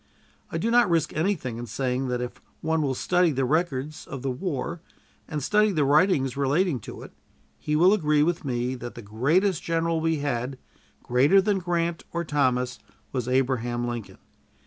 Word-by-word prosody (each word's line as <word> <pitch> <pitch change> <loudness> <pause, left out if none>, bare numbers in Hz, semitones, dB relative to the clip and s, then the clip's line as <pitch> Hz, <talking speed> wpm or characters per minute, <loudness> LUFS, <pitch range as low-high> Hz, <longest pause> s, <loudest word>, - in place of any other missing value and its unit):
I - - -2
do 230 - 0
not 240 -4 +5
risk 165 -3 +1
anything 155 - -1
in 120 - -6
saying 130 +3 -1
that 125 -1 -1
if 125 - -6 0.2
one 160 0 +1
will 135 -3 0
study 180 +5 +2
the 135 -1 0
records 150 -1 -1
of 135 -1 -7
the 135 - 0
war 160 +3 -3 0.5
and 150 -3 -4
study 210 +6 +3
the 155 -6 +1
writings 145 -3 +3
relating 140 +2 +1
to - - -9
it, - - -11 0.5
he 150 - -1
will 180 +6 +6
agree 150 -7 +3
with 170 +1 0
me 125 -2 -1
that 120 -1 -7
the 120 - -9
greatest 155 - +1
general 165 0 0
we 165 0 +1
had, 135 -3 -2 0.5
greater 135 +10 +4
than 200 0 +1
Grant 170 -2 -1
or 170 0 -1
Thomas, 125 -5 0 0.3
was 125 -3 -2
Abraham 125 -2 0
Lincoln. 120 -3 -6
145 Hz, 175 wpm, -26 LUFS, 125-170 Hz, 0.5 s, will